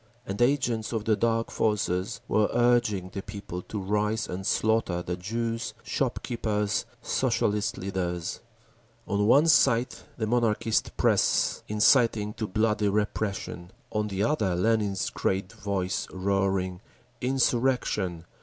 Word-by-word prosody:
and 100 +3 -4
agents 120 -4 +1
of 110 -2 -2
the 110 - +3
Dark 115 +2 0
Forces 100 -3 0
were 105 -1 +2
urging 120 -6 +2
the 100 - -4
people 95 -3 -7
to 105 - -7
rise 105 +2 0
and 95 +2 -4
slaughter 110 -6 +1
the 90 - -3
Jews, 115 +5 -3
shop - - -2
keepers, 105 -3 -1 0.2
Socialist 105 0 0
leaders…. 90 -3 -3 0.7
On 105 0 +1
one 140 +7 +6
side 125 -6 +4 0.2
the 110 - -1
Monarchist 115 -1 +1
press, - - +2
inciting 105 -1 +3
to 110 - -4
bloody 105 +1 +1
repression—on 105 -1 -3
the 100 -1 -1
other 105 -8 +1
Lenin's 100 0 +1
great 95 0 -1
voice 95 -3 -2
roaring, 95 -1 0 0.4
"Insurrection! 125 -9 0
105 Hz, 120 wpm, -27 LUFS, 95-115 Hz, 0.7 s, one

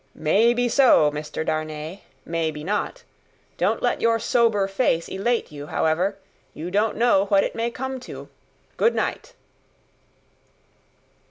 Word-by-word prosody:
"May 215 +10 +3
be 245 0 +1
so, 240 - +5
Mr. 150 +1 -5
Darnay; 155 +3 -4 0.3
may 165 -1 -1
be 150 -1 -7
not. 210 - -3 0.6
Don't - - 0
let - - 0
your 230 0 +3
sober 225 -4 +2
face 195 -5 0
elate 230 +2 -1
you, 145 -1 -8
however; 180 +7 0 0.4
you 165 +4 -6
don't 210 +3 +1
know 225 -4 +3
what 195 -1 +3
it - - -3
may 230 +1 -1
come 265 +2 -5
to. 250 - -10 0.5
Good 470 - +3
night!" - - -3
195 Hz, 140 wpm, -23 LUFS, 160-235 Hz, 0.6 s, so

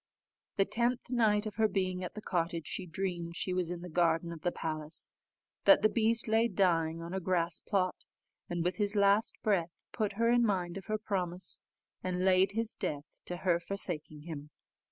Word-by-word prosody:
The 195 - +3
tenth 240 +3 0
night 220 -3 +3
of 215 0 -6
her 220 -1 +4
being 185 -2 -1
at 180 - -6
the 215 - -7
cottage, 170 -2 -1
she 185 +3 -4
dreamed 170 -1 -3
she 185 - -1
was 180 -2 0
in 175 -1 -4
the 180 - -7
garden 170 0 +1
of 165 -2 -8
the 175 - 0
palace, 155 -1 -3 0.5
that 295 - +7
the 215 - +6
beast 230 0 +3
lay 225 +1 +3
dying 165 -6 +1
on 170 +2 -6
a 190 - -1
grass 170 -2 +1
plot, 185 -3 -1 0.4
and 175 -1 -1
with 180 +1 -1
his 205 -1 +1
last 200 +1 +3
breath 185 -6 +2 0.2
put 215 -3 -1
her 230 +3 +2
in 240 0 +4
mind 180 -5 0
of 195 - -8
her 215 - 0
promise, 185 -4 0 0.4
and 185 0 -1
laid 190 +1 +4
his 225 +1 +1
death 145 -1 -3 0.2
to 180 - -3
her 175 -2 +4
forsaking 165 -5 -5
him. 150 -3 -7
185 Hz, 195 wpm, -32 LUFS, 170-210 Hz, 0.5 s, that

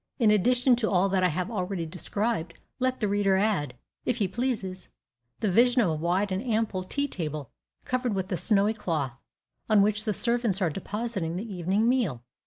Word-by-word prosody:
In 225 -5 +4
addition 245 +5 +4
to 225 -3 0
all 190 +1 +3
that 190 -1 +1
I - - +5
have 180 +5 -2
already 185 -4 -2
described, 180 +1 -2 0.2
let 255 0 0
the 210 - +1
reader 200 -1 +2
add, 190 -11 0 0.3
if - - 0
he 205 -5 +1
pleases, 195 -4 -3 0.5
the 210 - +1
vision 245 +5 +4
of 210 -7 +3
a - - 0
wide 175 +6 0
and 185 +1 -1
ample 220 -6 0
tea 280 +10 -1
table, 155 - -5 0.3
covered 250 -4 -1
with 190 +1 -3
a - - +1
snowy 210 +1 +3
cloth, 160 - -2 0.6
on 210 -2 +6
which 210 +1 0
the 215 - +1
servants 235 -3 0
are 180 -5 +1
depositing 195 -2 -3
the 205 +3 -5
evening 190 +5 +1
meal. 215 - +1
200 Hz, 190 wpm, -27 LUFS, 180-230 Hz, 0.6 s, on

